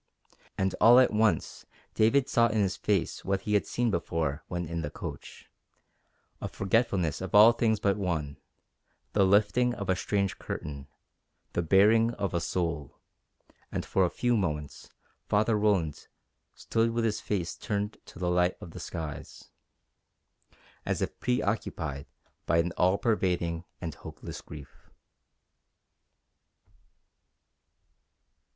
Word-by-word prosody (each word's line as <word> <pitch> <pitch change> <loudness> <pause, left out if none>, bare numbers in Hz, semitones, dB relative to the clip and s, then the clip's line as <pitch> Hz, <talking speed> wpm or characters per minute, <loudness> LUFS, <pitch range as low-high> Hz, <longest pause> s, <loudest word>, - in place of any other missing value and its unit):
And 95 -1 0
all 120 +3 +8
at 130 - +4
once 110 0 0 0.3
David 125 +5 +3
saw 115 0 +4
in 110 -1 -2
his 95 -2 +1
face 100 -6 -1
what 95 0 -1
he 105 - -2
had 105 - +2
seen 120 -2 0
before 80 -4 -2
when 90 -1 -3
in 85 +1 -4
the 75 - -3
coach - - -9 0.9
a - - -3
forgetfulness 100 -5 0
of 95 0 -3
all 110 +3 +9
things 115 -2 +1
but 100 0 +1
one, 80 -8 -2 0.8
the 100 - +4
lifting 105 +5 +3
of 100 -2 -2
a - - +2
strange 100 +1 -1
curtain, 70 -2 -6 0.7
the - - +1
baring 105 +7 +4
of 100 - -3
a 85 - +1
soul; 85 -3 -3 0.7
and - - -3
for 95 - +2
a 90 - +2
few 120 +5 0
moments 75 -8 -3 0.4
Father 110 +2 +2
Roland 100 -8 0 0.5
stood 115 +1 0
with 115 0 -1
his 110 -2 -1
face 90 -5 -2
turned 105 0 -3
to - - -14
the 90 0 -1
light 90 0 +2
of 85 - -10
the - - -9
skies, 75 -4 -7 1.3
as - - -1
if - - -5
preoccupied 100 - -2 0.4
by 85 - +3
an 85 +1 +1
all 95 +2 +3
pervading 90 -7 0
and 85 -3 -5
hopeless - - -9
grief. 75 -2 -13
95 Hz, 135 wpm, -29 LUFS, 85-110 Hz, 1.3 s, all